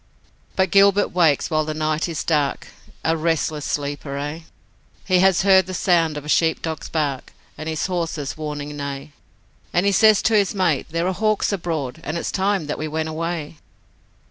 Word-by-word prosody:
But 190 0 +1
Gilbert 200 0 +5
wakes 165 -3 +2
while 155 0 +2
the 155 0 -4
night 155 +2 -1
is 160 - -3
dark 150 -4 0 0.4
A 165 - +2
restless 160 -2 -1
sleeper, 145 -1 -3
aye, 150 +3 -5 0.6
He 185 -2 +3
has 190 0 +4
heard 190 -2 +5
the 185 - -5
sound 165 -5 +2
of 150 - -7
a - - -8
sheep 160 +1 +2
dog's 160 -1 -4
bark, 145 -4 -2 0.2
And 155 +1 -6
his 160 -1 -2
horse's 165 -6 -3
warning 150 -1 -5
neigh, 140 0 -6 0.6
And 175 +2 +1
he 200 - +4
says 215 +2 +5
to 225 - +2
his 205 -1 +2
mate, 175 -8 +1
'There 165 +2 -1
are 190 - 0
hawks 215 +2 +1
abroad, 160 -9 -3
And 155 +4 -3
it's - - -3
time 195 -3 0
that 150 - -4
we 155 - -2
went 160 +1 -2
away.' 160 -1 -4
160 Hz, 185 wpm, -22 LUFS, 150-185 Hz, 0.6 s, Gilbert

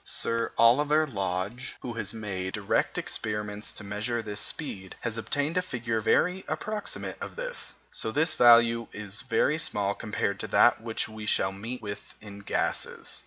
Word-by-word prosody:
Sir 115 0 0
Oliver 145 +7 +5
Lodge, 100 0 -3
who 120 - -4
has 115 - -3
made 95 -4 -4
direct 105 -2 +1
experiments 105 -1 -2
to - - -7
measure 110 +4 -2
this 105 -1 -4
speed, 95 - -4
has 115 -2 -2
obtained 145 +8 -1
a - - +4
figure 120 -9 -2
very 180 - +2
approximate 215 0 -3
to - - -2
this. - - -4 0.3
This 150 +9 +1
value 115 -1 +6
is 105 +1 -4
very 150 +4 +2
small 100 -8 0
compared 100 -2 -2
to 110 - -4
that 120 - +5
which 115 -1 -2
we 110 -1 -8
shall 95 - +2
meet 115 +6 -6
with 100 -1 -7
in 100 -1 -10
gases. 100 - -1
115 Hz, 160 wpm, -28 LUFS, 105-125 Hz, 0.3 s, value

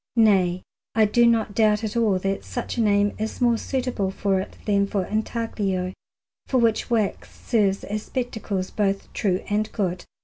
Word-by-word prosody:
Nay, 190 -6 +3 0.3
I 220 -1 +5
do 235 +3 +4
not 225 -3 +2
doubt 215 0 +3
at 220 +1 -3
all 220 -5 +3
that 195 +1 -2
such 245 - -4
a - - +2
name 205 -1 +3
is 220 +1 -3
more 240 -2 +4
suitable 250 -7 -1
for 195 0 0
it 190 - -6
than 200 -1 +2
for 195 -2 -1
intaglio, 205 -4 -2 0.5
for 260 - +1
which 230 -1 +2
wax 220 -4 0
serves 200 -4 0
as 210 +1 -3
spectacles 220 -6 -3
both 200 -2 -1
true 190 -2 0
and 210 +1 0
good. 185 -4 -2
210 Hz, 170 wpm, -24 LUFS, 195-230 Hz, 0.5 s, I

